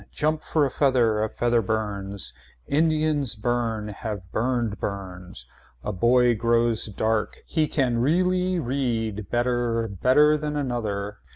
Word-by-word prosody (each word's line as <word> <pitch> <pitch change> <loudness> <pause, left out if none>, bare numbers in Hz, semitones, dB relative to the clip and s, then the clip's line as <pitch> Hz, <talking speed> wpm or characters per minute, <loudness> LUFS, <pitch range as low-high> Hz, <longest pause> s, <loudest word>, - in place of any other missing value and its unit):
Jump 155 +1 0
for 155 -3 +1
a 135 - -2
feather. 120 -6 +2
A 110 - -1
feather 120 +1 +1
burns. 100 - -3 0.3
Indians 155 -3 +2
burn 115 -1 -1
have 105 -3 -6
burned 115 -3 -1
burns. 95 - -5 0.4
A 105 - -3
boy 120 +5 +4
grows 115 0 +1
dark. 110 +1 -1
He 155 -2 0
can 125 -6 +1
really 180 +6 +2
read 115 - -2
better 120 -1 0
better 130 - +4
than 150 0 -3
another. 110 -7 -3
120 Hz, 125 wpm, -25 LUFS, 105-140 Hz, 0.4 s, boy